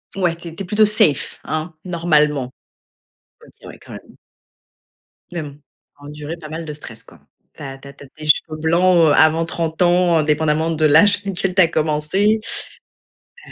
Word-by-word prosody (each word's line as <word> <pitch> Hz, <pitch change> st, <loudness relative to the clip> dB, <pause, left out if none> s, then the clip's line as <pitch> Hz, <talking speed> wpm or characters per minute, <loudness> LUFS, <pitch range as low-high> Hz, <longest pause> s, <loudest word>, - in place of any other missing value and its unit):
Ouais, 180 Hz, -3 st, 0 dB
tu 170 Hz, 0 st, -10 dB
es 160 Hz, -, -13 dB
tu 195 Hz, -, -6 dB
es -, -, -9 dB
plutôt 210 Hz, +4 st, +2 dB
safe 210 Hz, -, +1 dB
hein, 155 Hz, +2 st, -4 dB
normalement. 150 Hz, -7 st, 0 dB, 0.9 s
OK, -, -, -18 dB
ouais, -, -, -12 dB
quand -, -, -14 dB
même -, -, -13 dB, 1.2 s
mais 175 Hz, -, -4 dB
bon, 150 Hz, -, -7 dB
tu 140 Hz, -, -18 dB, 0.4 s
as -, -, -18 dB
enduré 150 Hz, +3 st, -8 dB
pas 155 Hz, -2 st, -11 dB
mal 160 Hz, +1 st, -6 dB
de 150 Hz, -, -7 dB
stress 115 Hz, -6 st, -11 dB
quoi. -, -, -19 dB, 0.4 s
Tu -, -, -15 dB
as 135 Hz, -1 st, -8 dB
tu 135 Hz, +1 st, -15 dB
as 140 Hz, -, -12 dB
tu 140 Hz, -, -16 dB
as -, -, -16 dB
des 155 Hz, 0 st, -8 dB
cheveux 155 Hz, +1 st, +1 dB
blancs, 170 Hz, +3 st, +2 dB
heu, -, -, +3 dB
avant 160 Hz, +2 st, +3 dB
30 165 Hz, 0 st, -3 dB
ans, 175 Hz, -1 st, +3 dB
indépendamment 155 Hz, +1 st, 0 dB
de 160 Hz, -1 st, 0 dB
l'âge 200 Hz, +8 st, +6 dB
auquel 190 Hz, -1 st, -3 dB
tu 190 Hz, -, +5 dB
as 165 Hz, -, +5 dB
commencé, 160 Hz, +7 st, 0 dB, 1.1 s
heu -, -, -14 dB
160 Hz, 195 wpm, -18 LUFS, 150-175 Hz, 1.2 s, l'âge